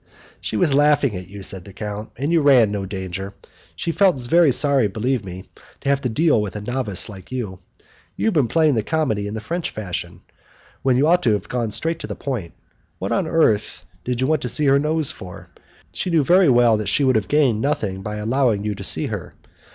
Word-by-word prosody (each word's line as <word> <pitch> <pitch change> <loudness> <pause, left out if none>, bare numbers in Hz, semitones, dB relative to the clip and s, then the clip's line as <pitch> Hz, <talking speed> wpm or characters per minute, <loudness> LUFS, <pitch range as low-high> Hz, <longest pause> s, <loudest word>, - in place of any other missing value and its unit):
"She - - -3
was 165 -6 +2
laughing 145 -5 +3
at 90 0 -7
you," 100 +1 -10
said 95 -2 -4
the 100 - -13
count, 105 +1 -6
"and 140 +6 -2
you 170 -2 +3
ran 130 -7 +5
no 100 -2 -3
danger. 95 0 -6 0.4
She 170 - -2
felt 185 -5 +3
very 155 +5 +4
sorry, 135 -2 +3
believe 115 +4 -1
me, 95 -1 -8 0.4
to - - -2
have 140 0 +2
to 125 - -1
deal 145 -1 +2
with 105 -1 -5
a 105 - -4
novice 110 -4 -1
like 95 -2 -12
you. 110 -8 -4 0.6
You - - -2
have 220 - +2
been 145 -7 +2
playing 155 +3 +3
the 115 - +1
comedy 110 -7 -1
in 105 - -5
the - - -3
French 170 +8 -3
fashion, 100 -5 -6 0.6
when 130 -2 +2
you 140 - +3
ought 175 +3 +4
to 115 - +2
have 105 -1 -3
gone 120 -3 -2
straight 165 +9 -1
to - - -6
the - - -5
point. 115 -12 -5 0.4
What 95 - -4
on 185 -4 0
earth 155 -11 +1 0.2
did 125 -1 -2
you - - +2
want 155 +1 +1
to 125 - -2
see 150 - +1
her 140 0 +4
nose 155 0 0
for? 90 -1 -11 0.4
She - - -3
knew 165 -4 +3
very 180 +2 +5
well 120 -3 +4
that 105 -2 -2
she 145 - +2
would 130 -2 +3
have 110 -3 0
gained 135 -8 +2
nothing 105 -9 -1
by 105 +2 -5
allowing 110 0 0
you 105 - -1
to 100 0 -8
see - - +2
her. - - -6
125 Hz, 230 wpm, -21 LUFS, 105-145 Hz, 0.6 s, ran